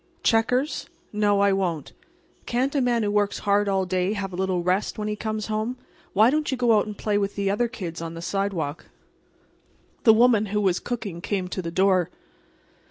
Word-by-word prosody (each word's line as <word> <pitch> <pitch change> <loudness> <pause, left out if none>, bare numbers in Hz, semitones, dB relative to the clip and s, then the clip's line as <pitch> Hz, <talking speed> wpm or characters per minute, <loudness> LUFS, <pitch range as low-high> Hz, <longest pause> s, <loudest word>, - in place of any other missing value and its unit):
"Checkers. 250 +6 +1 0.2
No, 205 -1 +2
I 200 -1 +4
won't. 175 -6 -2 0.5
Can't 255 +3 0
a 280 - +2
man 240 -2 +1
who 205 - 0
works 205 -1 +1
hard 205 0 +1
all 190 -1 +1
day 185 +2 0
have 195 -3 -4
a - - -4
little 185 -1 -1
rest 185 +3 0
when 210 0 -3
he 210 - -1
comes 215 0 -3
home? 220 +3 -2 0.4
Why 220 +5 +5
don't 305 +1 0
you 265 - -1
go 240 -2 +4
out 205 - -2
and 210 -1 -7
play 205 -1 0
with 200 0 -2
the 200 -1 0
other 240 +4 +1
kids 180 -9 -6
on 165 0 -5
the 165 - -7
sidewalk?" 190 -7 -2 1.2
The 220 - +8
woman 225 -2 +4
who 210 +1 0
was 190 -3 +2
cooking 215 -8 -5
came 190 -1 -2
to 185 - -3
the 170 - -4
door. 185 0 +2
205 Hz, 200 wpm, -25 LUFS, 190-220 Hz, 1.2 s, The